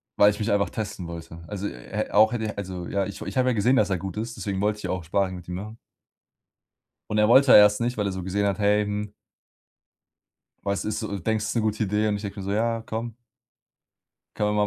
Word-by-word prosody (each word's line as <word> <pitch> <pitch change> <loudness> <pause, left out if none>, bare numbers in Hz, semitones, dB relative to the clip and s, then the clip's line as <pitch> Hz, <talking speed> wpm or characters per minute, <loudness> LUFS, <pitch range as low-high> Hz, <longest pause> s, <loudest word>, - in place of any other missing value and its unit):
weil 100 - +6
ich 105 - -2
mich 110 +1 0
einfach 100 0 +2
testen 100 -5 -5
wollte. 85 0 -9
Also, 100 -1 -5
e - - -5
er 65 - -5
auch 110 +1 +6
hätte 110 -2 -2
also, 95 -3 -5
ja, 100 +1 -1
ich 100 - -7
ich - - -6
habe 130 0 +3
ja - - +2
gesehen, 120 +5 +3
dass - - +3
er 95 - +1
gut 95 0 -6
ist, 115 +2 -4
deswegen 100 -2 -3
wollte 105 0 +1
ich - - -11
ja - - -2
auch 95 -2 -3
Sparring 95 +3 0
mit 90 -1 -10
ihm 90 - -4
machen. 105 +4 -7 1.3
Und 105 - 0
er 105 0 +4
wollte 130 +3 +7
ja - - +11
erst 105 +1 +6
nicht, 120 0 -1
weil 105 - 0
er 100 - -1
so 95 -1 -5
gesehen 100 +2 0
hat: 100 0 0
„Hey, 105 0 +3
hm.“ 105 0 -4 1.5
„Was 100 0 -1
ist 105 0 -2
so, 105 -3 -3
denkst, 105 +3 -1
das 105 - -2
ist - - -4
'ne 115 - +2
gute 110 +1 0
Idee?“ 105 +2 +1
Und 105 - 0
ich 100 - -7
denke 100 0 -6
mir 95 - -6
so: 100 - -2
„Ja, 115 +2 0
komm“ 115 0 -5 1.2
„Können 105 0 +1
wir 105 0 +2
105 Hz, 255 wpm, -25 LUFS, 100-110 Hz, 1.5 s, ja